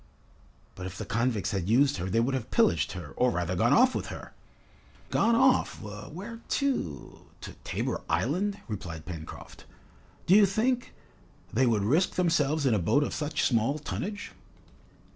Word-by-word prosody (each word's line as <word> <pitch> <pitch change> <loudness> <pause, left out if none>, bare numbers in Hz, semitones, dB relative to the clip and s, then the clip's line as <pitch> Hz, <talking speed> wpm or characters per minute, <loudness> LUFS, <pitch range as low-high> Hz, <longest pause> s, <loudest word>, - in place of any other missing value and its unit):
"But 90 0 -6
if 95 +1 -8
the - - -5
convicts 115 -2 0
had 95 -2 -2
used 135 +3 +4
her, 90 +1 -3
they 115 - +2
would 125 +4 +1
have 130 -4 -3
pillaged 80 -3 +2
her, 85 -6 -7
or 125 - +3
rather 90 -4 -1
gone 115 +7 +2
off 255 +2 +5
with - - -3
her." - - -8 0.8
"Gone 230 0 +3
off! 260 +2 +3
where 155 - -8
to 255 - -2
to - - -8
Tabor - - -2
Island?" 195 - 0
replied 85 -7 -6
Pencroft. 80 -3 -9 0.6
"Do 180 - +4
you 205 -1 +7
think, 245 +6 0 0.6
they 130 +3 +3
would 110 -4 +2
risk 155 - +2
themselves 160 -4 +1
in 130 - +3
a 105 - +2
boat 140 - +2
of - - -3
such 150 0 -2
small 120 +4 +2
tonnage?" 205 +7 -5
125 Hz, 160 wpm, -28 LUFS, -, 0.8 s, you